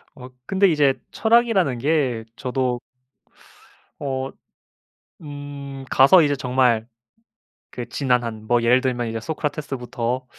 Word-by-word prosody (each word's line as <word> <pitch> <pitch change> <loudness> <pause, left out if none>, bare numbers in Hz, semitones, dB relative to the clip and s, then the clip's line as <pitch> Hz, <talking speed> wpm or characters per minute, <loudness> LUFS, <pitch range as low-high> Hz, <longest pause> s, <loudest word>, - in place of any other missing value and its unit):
아 130 -2 -11 0.2
근데 195 +5 +3
이제 150 -5 +3 0.2
철학이라는 220 - +2
게 130 -4 0
저도 125 -1 -2 1.2
어 135 -1 -3 0.9
음 145 -2 -8
가서 140 +7 +7
이제 145 -2 +1
정말 125 -3 +1 0.8
그 120 - -7
지난한 120 -5 -1
뭐 120 +1 +2
예를 125 +2 +4
들면 125 -3 -1
이제 115 0 -3
소크라테스부터 130 -3 -3
130 Hz, 225 characters per minute, -22 LUFS, 125-145 Hz, 1.2 s, 가서